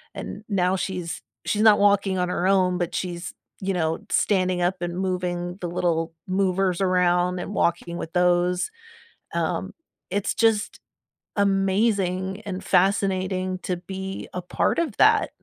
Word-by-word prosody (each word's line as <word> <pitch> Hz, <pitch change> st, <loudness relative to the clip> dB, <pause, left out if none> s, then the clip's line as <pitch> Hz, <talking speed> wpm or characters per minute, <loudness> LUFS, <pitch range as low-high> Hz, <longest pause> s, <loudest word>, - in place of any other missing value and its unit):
and 210 Hz, -, -7 dB
now 185 Hz, -1 st, +2 dB
she's 180 Hz, -3 st, -4 dB, 0.2 s
she's 210 Hz, -, 0 dB
not 215 Hz, -2 st, +7 dB
walking 200 Hz, -2 st, +3 dB
on 180 Hz, 0 st, 0 dB
her 180 Hz, -, -1 dB
own, 185 Hz, -2 st, +3 dB
but 175 Hz, -1 st, -2 dB
she's, 175 Hz, -1 st, -4 dB, 0.3 s
you 195 Hz, 0 st, -1 dB
know, 160 Hz, -2 st, 0 dB
standing 185 Hz, -3 st, +2 dB
up 180 Hz, +2 st, +1 dB
and 175 Hz, 0 st, -3 dB
moving 180 Hz, -1 st, -2 dB
the 175 Hz, -, -2 dB
little 165 Hz, -2 st, 0 dB
movers 185 Hz, -1 st, +1 dB
around 180 Hz, -1 st, +2 dB
and 190 Hz, -, -5 dB
walking 170 Hz, -1 st, 0 dB
with 165 Hz, -, -6 dB
those, 180 Hz, -, +2 dB, 0.6 s
um, -, -, -1 dB, 0.4 s
it's 200 Hz, 0 st, -1 dB
just 225 Hz, -2 st, +1 dB, 0.6 s
amazing 195 Hz, -1 st, +1 dB
and 190 Hz, -3 st, -6 dB
fascinating 185 Hz, -1 st, +1 dB
to 180 Hz, -2 st, -3 dB
be 190 Hz, +2 st, -6 dB
a 180 Hz, -, -3 dB
part 180 Hz, -, 0 dB
of 310 Hz, -11 st, -2 dB
that 435 Hz, 0 st, +5 dB
185 Hz, 145 wpm, -24 LUFS, 180-195 Hz, 0.6 s, not